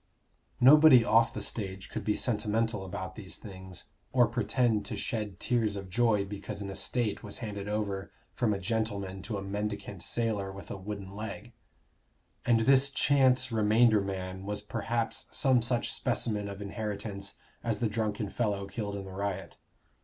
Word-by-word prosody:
Nobody 135 -2 +8
off 115 +1 +5
the 105 - -5
stage 95 -3 -5
could - - -4
be 105 - +1
sentimental 110 -2 0
about 95 -1 -5
these 95 -2 -7
things, 95 -4 -9 0.3
or 125 -2 +5
pretend 115 -1 +1
to - - -4
shed 105 -5 -3
tears 115 -4 +1
of 95 -2 -7
joy 110 -2 +3
because 100 0 -6
an 100 -1 -4
estate 115 +2 -1
was 105 -2 -5
handed 100 -3 -5
over 100 -2 -2 0.2
from 120 -4 +1
a 100 - +1
gentleman 100 -2 -2
to 105 +2 -4
a 100 - -4
mendicant 100 -1 -4
sailor 110 -5 -1
with 95 -3 -9
a - - -3
wooden 100 0 -6
leg. 110 +3 -6 0.9
And 115 -2 +5
this 135 +3 +5
chance 130 -2 +3
remainder 110 0 +4
man 95 -1 -4
was 105 +1 -3
perhaps 115 +2 -2
some 130 -3 +3
such 120 +1 0
specimen 105 -3 -1
of 100 +1 -6
inheritance 100 -1 -4 0.3
as 115 -3 0
the 115 - +1
drunken 105 -1 -1
fellow 100 -2 -1
killed 100 0 -4
in 100 -1 -5
the 95 - -9
riot. 100 0 -3
105 Hz, 160 wpm, -30 LUFS, 100-115 Hz, 0.9 s, Nobody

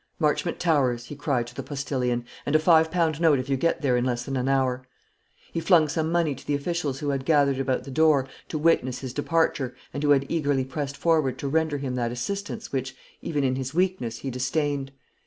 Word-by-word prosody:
"Marchmont 160 +2 0
Towers!" 130 -8 +1
he 145 - -8
cried 140 -4 0
to 120 - -11
the - - -5
postillion; 125 -4 -2 0.2
"and 145 - -1
a - - +9
five 160 0 +4
pound 165 -3 0
note 160 -4 +5
if 130 +1 -4
you 135 - +2
get 160 +4 0
there 130 -3 +3
in 120 - +1
less 120 -1 -1
than 135 - -3
an 130 +1 0
hour." 130 -2 +1 0.7
He - - 0
flung 165 -2 +4
some 160 +2 -1
money 170 -4 +2
to 135 - -13
the 145 - +1
officials 145 -2 -2
who 145 +1 -3
had 135 -1 -1
gathered 140 -2 +3
about 130 -1 0
the 135 - -9
door 150 -2 +3 0.2
to 155 - -2
witness 150 -5 +2
his 130 -2 -5
departure, 145 -4 0 0.2
and 140 - -3
who 150 - +1
had 140 -1 +4
eagerly 145 -5 0
pressed 140 +1 -4
forward 155 -4 +2
to 140 - -4
render 155 0 +1
him 135 -2 -3
that 120 -1 -1
assistance 200 - -4
which, 130 -1 -3 0.3
even 145 -3 -1
in 130 -1 +1
his 135 +2 -4
weakness, 180 -11 0
he 135 +3 -5
disdained. 135 +2 -1
140 Hz, 220 wpm, -25 LUFS, 130-160 Hz, 0.7 s, a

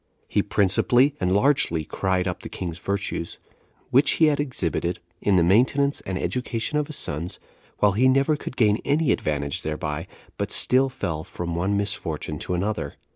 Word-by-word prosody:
He - - +1
principally 120 +8 +3
and 90 -1 0
largely 100 - +2
cried 95 +1 -1
up 90 - -4
the - - -8
king's 85 -2 -5
virtues, 100 -4 -3 0.5
which 140 +3 +5
he 160 - +4
had 150 -2 +2
exhibited 90 - -1 0.2
in 100 - +2
the 90 - +4
maintenance 130 - +3
and 95 0 -2
education 125 +4 -2
of 150 - -2
his 155 - -5
sons; 80 - -3 0.4
while 105 - +4
he 120 +7 +3
never 135 +4 +3
could 130 - -8
gain 110 -3 +3
any 150 0 +2
advantage 70 -2 -1
thereby, 75 +1 -4 0.3
but - - -2
still 130 +1 +4
fell 80 -12 -4
from 85 -1 -5
one 95 +4 0
misfortune 80 -7 -3
to 90 - -2
another. 105 +4 -2
100 Hz, 170 wpm, -24 LUFS, 85-130 Hz, 0.5 s, which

